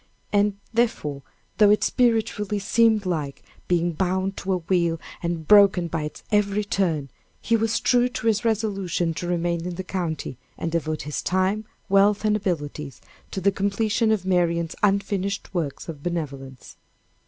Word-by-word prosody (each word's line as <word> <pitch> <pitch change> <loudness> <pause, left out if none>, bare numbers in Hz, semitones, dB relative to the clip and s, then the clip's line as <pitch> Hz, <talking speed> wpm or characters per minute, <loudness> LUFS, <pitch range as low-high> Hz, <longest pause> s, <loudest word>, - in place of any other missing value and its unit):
And, 205 0 +2 0.2
therefore, 185 -12 0 0.4
though 210 -1 +7
it 210 - +4
spiritually 220 -4 +1
seemed 220 +1 +3
like 155 -6 -3 0.2
being 175 -1 +2
bound 190 +3 -1
to 190 0 -1
a - - +2
wheel 170 -1 0 0.2
and 170 -2 -3
broken 200 -4 +6
by 160 -2 -2
its 150 - -8
every 210 0 +2
turn, 165 -9 -1 0.3
he 230 - +1
was 225 0 +1
true 245 0 +3
to 240 - -6
his 220 -2 +2
resolution 195 -7 0
to 175 - -5
remain 170 -1 -1
in 180 - -4
the 190 - -4
county 165 -9 -4 0.2
and 165 - -3
devote 155 -2 -2
his 150 0 -3
time, 190 +4 0 0.2
wealth, 200 +2 +3
and 210 0 +3
abilities 150 -8 -3 0.3
to - - -4
the 200 +2 +3
completion 210 +3 +1
of 205 -4 0
Marian's 170 -3 +1
unfinished 200 -1 0
works 160 -6 -3
of 155 -4 -7
benevolence. 140 -6 -5
190 Hz, 155 wpm, -24 LUFS, 165-210 Hz, 0.4 s, though